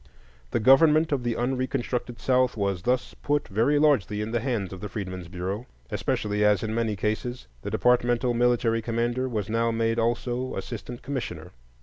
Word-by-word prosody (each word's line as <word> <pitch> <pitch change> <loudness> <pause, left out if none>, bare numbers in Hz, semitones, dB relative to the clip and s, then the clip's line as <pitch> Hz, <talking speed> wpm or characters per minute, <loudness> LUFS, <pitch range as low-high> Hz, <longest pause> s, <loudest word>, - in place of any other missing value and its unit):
The - - 0
government 150 +6 +5
of 140 -3 +1
the 120 -2 -1
unreconstructed 125 -1 -2
South 130 -2 +2
was 100 -3 -1
thus 125 +6 0
put 145 0 0
very 115 +9 +2
largely 140 -9 +3
in 105 +1 -3
the 120 - +1
hands 110 -6 -2
of 95 - -9
the 105 - -5
Freedmen's 95 -4 -5
Bureau, 95 +7 -4 0.2
especially 105 0 -1
as 105 0 +3
in 110 0 -2
many 115 -2 0
cases 120 +5 -2 0.2
the - - -4
departmental 120 0 +2
military 120 -1 +2
commander 120 +3 -1
was 105 -5 -2
now 115 +1 +1
made 115 0 0
also 120 +2 -1
assistant 120 +1 -6
commissioner. 135 -2 -5
120 Hz, 165 wpm, -26 LUFS, 105-125 Hz, 0.2 s, government